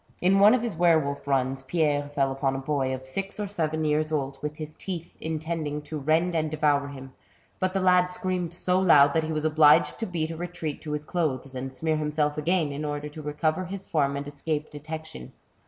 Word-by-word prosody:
In 190 +2 +3
one 210 +4 +7
of 245 - -1
his 235 -6 -1
were 170 -1 +5
wolf 140 -2 -3
runs, 135 -1 +1
Pierre 145 0 0
fell 140 -2 0
upon 135 0 -1
a - - -1
boy 135 -1 -1
of 130 0 -5
six 195 +10 -4
or 205 - -2
seven 160 -5 -1
years 155 +1 +1
old, 135 -3 -2
with 150 0 -4
his 155 -1 -7
teeth, 175 -3 -6
intending 155 -1 -3
to 150 +1 -5
rend 160 +5 +2
and 160 -1 0
devour 145 -2 +1
him, 135 -2 -10 0.5
but 185 0 -1
the - - +3
lad 180 -1 +5
screamed 180 -2 -2
so 180 +1 +1
loud 145 -6 +6
that 160 -1 +1
he 160 - -3
was 155 0 -1
obliged 150 -1 +5
to 225 - -2
beat 165 -3 -2
a - - -5
retreat 170 -3 -5
to 150 - -5
his 150 0 -3
clothes, 140 -7 -2
and 130 +1 -5
smear 155 +4 -1
himself 150 -1 0
again, 160 0 +1
in 140 +2 -4
order 145 0 -3
to 155 +1 -9
recover 155 +4 -1
his 195 +2 -6
form 140 -5 +1
and 140 0 -5
escape 150 +1 -3
detection. 155 - -8
155 Hz, 220 wpm, -26 LUFS, 145-170 Hz, 0.5 s, one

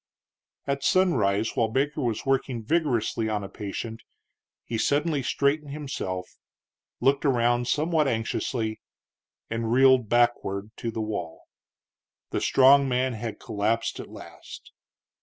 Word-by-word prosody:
At 140 0 -2
sunrise, 115 - +2
while 115 - +2
Baker 140 +6 -1
was 115 -4 -2
working 135 -3 0
vigorously 120 -7 0
on 105 -1 -2
a 95 - -7
patient, 110 +2 -6 0.6
he 115 -1 -3
suddenly 145 +2 +1
straightened 140 +2 0
himself, 95 -11 -5 0.6
looked 140 +1 +3
around 120 -3 +2
somewhat 155 +3 +1
anxiously, 115 -1 -2 0.7
and 115 0 -2
reeled 130 -2 +5
backward 115 -4 +1
to 115 - -3
the 110 0 -4
wall. 105 -7 -5 0.9
The - - -1
strong 135 +1 +5
man 130 0 0
had 115 0 -5
collapsed 110 +3 -1
at - - -8
last. - - -12
120 Hz, 120 wpm, -26 LUFS, 110-140 Hz, 0.9 s, reeled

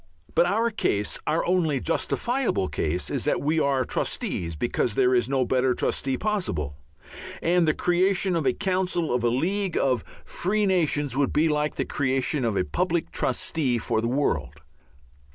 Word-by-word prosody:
But 175 - +4
our 225 +5 +1
case, 105 - -1
our 160 - +1
only 165 -6 +1
justifiable 235 - 0
case, 80 +4 -2
is - - -1
that - - +1
we 155 +3 +1
are 140 -3 +2
trustees 85 -7 -2
because 115 +4 -1
there 130 -1 +3
is 120 -1 +2
no 135 -2 +1
better 130 0 +1
trustee 135 -1 -1
possible. 90 - -2 0.7
And 170 0 +3
the 155 - +2
creation 185 +1 +1
of 160 -5 0
a 130 - +3
council 185 -4 -1
of 125 -1 0
a 120 - +3
League 185 +9 0
of 125 -6 +1 0.2
Free 210 +4 0
Nations 150 -8 +1
would 140 0 +1
be 155 +2 +3
like 150 0 0
the - - -1
creation 135 0 0
of 115 -3 0
a 90 - +1
Public 175 - -1
Trustee 135 -7 0
for 110 0 -1
the 115 - -1
world. 135 +4 -1
145 Hz, 170 wpm, -25 LUFS, 125-180 Hz, 0.7 s, But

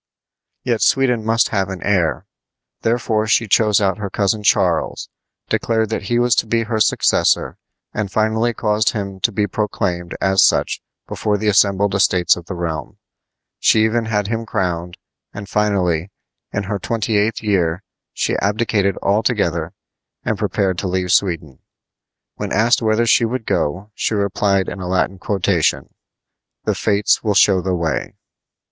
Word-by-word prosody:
Yet 120 -3 -1
Sweden 125 -4 +2
must 115 +1 +2
have 95 -3 -1
an 95 -3 -6
heir. 90 -6 0 0.6
Therefore 110 -2 0
she 115 +1 +2
chose 105 +1 +3
out 100 -1 0
her 100 -2 -4
cousin 100 +2 0
Charles, 95 -4 +1 0.4
declared 110 -2 0
that 110 - -3
he 120 - +2
was 120 -1 +3
to - - +1
be 115 +1 +1
her 110 -1 -2
successor, - - +2 0.3
and 105 -2 -3
finally 110 +3 +1
caused 105 -2 0
him 100 -3 -5
to 115 - +1
be 105 0 0
proclaimed 90 -4 -3
as 95 0 +3
such - - +2 0.3
before 105 -1 -1
the 105 +1 0
assembled 100 -1 +3
estates 95 -2 +3
of 85 -1 -11
the 95 - -5
realm. 80 -3 -4 0.6
She 110 - +4
even 115 +1 0
had 105 -2 -1
him 115 +2 -2
crowned; 90 -4 -3 0.4
and 105 -1 -7
finally, 95 -5 0 0.4
in 100 - -2
her 100 +1 -3
twenty 110 +2 -2
eighth 105 +2 0
year, 90 -3 0 0.3
she - - -1
abdicated 100 -1 0
altogether 100 -6 0 0.5
and - - -1
prepared 95 -2 -1
to 95 - -2
leave 90 -1 -1
Sweden. 85 -8 0 0.8
When - - -4
asked 115 +5 +3
whither 110 +1 +2
she 120 +1 +4
would 115 0 -2
go, 95 +8 -2
she 110 - -1
replied 100 -1 +1
in 100 - -6
a 90 - -5
Latin 95 +1 0
quotation: 95 -4 0 0.7
"The - - 0
Fates 105 -1 +1
will 105 -3 0
show 95 -2 +4
the 95 0 -1
way." 85 -2 -2
100 Hz, 155 wpm, -19 LUFS, 95-110 Hz, 0.8 s, She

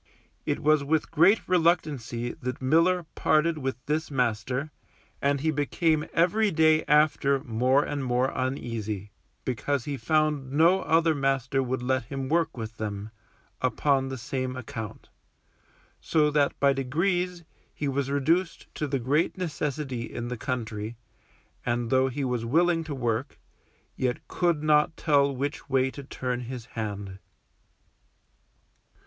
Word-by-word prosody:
It - - 0
was 155 -1 +3
with 155 +2 0
great 175 +7 +4
reluctancy 150 -9 +1
that 125 0 -3
Miller 165 +6 +3
parted 155 +1 +2
with 135 -3 -2
this 155 +2 -1
master, 125 +2 -1 0.5
and 140 0 +1
he 160 +1 +2
became 155 +1 +1
every 205 +6 +3
day 160 -2 +4
after 145 -2 +3
more 125 +4 +2
and 145 -2 -3
more 125 +1 +1
uneasy, 115 -6 -3 0.3
because 130 +1 -1
he 145 -2 -3
found 155 -3 +1
no 170 +6 +4
other 165 -1 +3
master 135 -2 0
would 130 -1 -2
let 130 -1 0
him 135 +1 -4
work 165 -3 +1
with 110 -1 -6
them, 105 0 -4 0.5
upon 135 +2 +1
the 130 - -4
same 130 +1 -3
account; 120 -3 -7 0.9
so 150 -2 +2
that 145 -1 +1
by 140 -1 +4
degrees 175 +6 -1 0.3
he 145 - -4
was 140 0 -1
reduced 165 +6 0
to 150 - -2
the 140 0 0
great 140 +9 +1
necessity 150 -7 -3
in 120 0 -4
the 125 - -3
country, 110 -2 -4 0.7
and 120 0 -1
though 130 0 +4
he 135 +2 -3
was 125 -2 -1
willing 165 +7 +2
to 150 -3 -4
work, 120 +1 -2 0.6
yet 125 -1 -2
could 170 -4 0
not 155 +1 +3
tell 140 -3 +3
which 145 +4 -4
way 130 0 +2
to 140 - -9
turn 125 -2 -3
his 125 -1 -6
hand. 100 -3 -5
140 Hz, 140 wpm, -27 LUFS, 125-155 Hz, 0.9 s, great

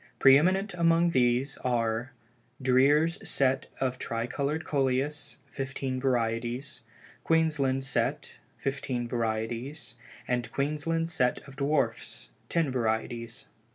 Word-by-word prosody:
Pre 135 0 +8
eminent 190 +6 +2
among 170 0 +3
these 125 0 +2
are 115 0 -1 0.5
"Dreer's 140 +6 +4
Set 130 -1 +1
of 130 -1 -1
Tri 115 0 -2
colored 145 +5 -2
Coleus," 140 +1 0
fifteen 130 -1 -4
varieties; 120 +1 -1 0.4
"Queensland 150 -5 +2
Set," 135 - -1 0.2
fifteen 130 -3 -2
varieties, 115 +4 -3 0.3
and 125 -1 -1
"Queensland 155 +4 -1
Set 125 -5 0
of 135 - -12
Dwarfs," 135 - -1 0.2
ten 165 -5 +1
varieties. 115 -1 -2
135 Hz, 105 wpm, -29 LUFS, 120-150 Hz, 0.5 s, Pre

